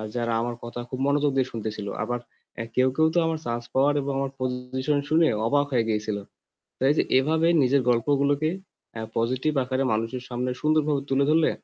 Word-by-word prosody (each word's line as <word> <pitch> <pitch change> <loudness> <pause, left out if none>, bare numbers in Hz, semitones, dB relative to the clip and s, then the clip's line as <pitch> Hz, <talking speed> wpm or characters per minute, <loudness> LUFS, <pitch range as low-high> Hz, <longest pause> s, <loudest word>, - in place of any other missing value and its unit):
যারা 115 -1 -1
আমার 120 0 -3
কথা 120 +1 -6
খুব 130 - -5
মনোযোগ 145 0 +2
দিয়ে 130 - +1
শুনতেছিল। 105 -2 -5 0.2
আবার 120 0 -2 0.6
কেউ, 130 +1 +4
কেউ 160 +1 +4
তো - - +5
আমার 160 -1 -1
chance 120 0 -3
পাওয়ার 140 +2 +3
এবং 140 0 -3
আমার 135 -1 -2
position 130 +2 -1
শুনে 160 +1 +4 0.2
অবাক 145 +3 +2
হয়ে 120 -3 +2
গিয়েছিল। 105 -1 -1 0.6
তো - - -7
এই - - +4
যে - - +5 0.2
এভাবে 160 +5 +2
নিজের 135 +1 +3
গল্পগুলোকে 140 +5 +2 0.5
অ্যা 110 -1 -5
positive 130 +6 0
আকারে 130 +1 -1
মানুষের 115 +3 -2
সামনে 125 +1 -2
সুন্দরভাবে 150 -2 +2
তুলে 135 +1 +3
ধরলে 160 0 +4
130 Hz, 180 wpm, -25 LUFS, 120-145 Hz, 0.6 s, তো